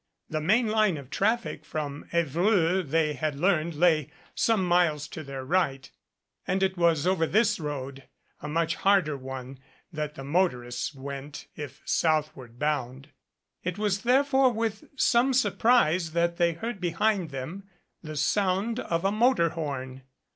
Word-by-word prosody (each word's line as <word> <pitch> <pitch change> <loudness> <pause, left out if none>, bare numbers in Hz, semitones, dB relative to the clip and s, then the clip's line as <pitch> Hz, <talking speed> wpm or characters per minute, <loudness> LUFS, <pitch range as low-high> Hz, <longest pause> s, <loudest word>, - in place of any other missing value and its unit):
The 155 -1 -1
main 220 +9 +3
line 215 -5 +2
of 140 -2 -11
traffic 225 +4 0
from 145 -2 -5
Evreux, 170 +3 +2
they 155 -1 0
had 150 +1 -2
learned, 170 -2 +1
lay 155 -2 +3 0.2
some 220 -5 +2
miles 170 -4 +2
to 160 - -7
their 135 -2 -7
right, 135 -4 0 0.6
and 190 +1 +1
it 190 0 +1
was 170 -4 +2
over 180 -3 +2
this 215 +3 +2
road, 140 -3 -5 0.4
a 150 - -5
much 165 +1 0
harder 190 -7 +3
one, 130 0 -8 0.3
that 150 -1 -4
the 135 - -8
motorists 135 -5 -1
went 140 +1 -7
if 145 -2 -8
southward 150 -7 0
bound. 140 -1 -2 0.5
It 180 +1 -3
was 205 -2 0
therefore 265 +2 +3
with 220 -2 -3
some 260 0 +3
surprise 185 -10 +3
that 170 0 +1
they 170 -1 +2
heard 205 +4 -5
be 175 - 0
hind 210 -6 +1
them 160 +9 -7 0.3
the 155 -1 -7
sound 195 +8 0
of 170 -3 -2
a 195 - +3
motor 215 -5 +3
horn. 135 -5 -5
165 Hz, 150 wpm, -27 LUFS, 145-195 Hz, 0.6 s, main